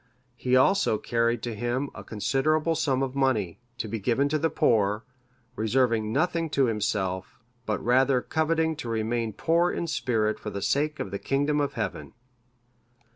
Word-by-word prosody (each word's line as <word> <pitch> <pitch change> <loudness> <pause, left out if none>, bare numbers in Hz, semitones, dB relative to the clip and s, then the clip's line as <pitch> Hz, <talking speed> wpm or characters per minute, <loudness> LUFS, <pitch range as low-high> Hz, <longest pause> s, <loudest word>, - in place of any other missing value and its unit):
He 125 +1 +1
also 130 - +4
carried 115 +1 0
to 120 - -3
him 120 +5 -2
a - - -9
considerable 150 +8 0
sum 135 -4 0
of 130 -1 -3
money, 115 -11 0 0.2
to 110 -1 -3
be 110 +1 -4
given 125 +7 +1
to 155 +1 0
the 165 +2 +1
poor, 105 -3 +2 0.5
reserving 110 -1 +1
nothing 165 +4 0
to 135 - +5
himself, 105 -1 -2 0.3
but 105 - -2
rather 130 +2 +4
coveting 160 +3 0
to 120 - -5
remain 115 0 -1
poor 170 - +2
in 170 - -2
spirit 110 -9 0
for 105 - -5
the 100 -2 -5
sake 150 +1 0
of 95 - -4
the 100 - -3
kingdom 145 +2 0
of 140 - -1
Heaven. 105 -4 -4
125 Hz, 165 wpm, -27 LUFS, 110-145 Hz, 0.5 s, to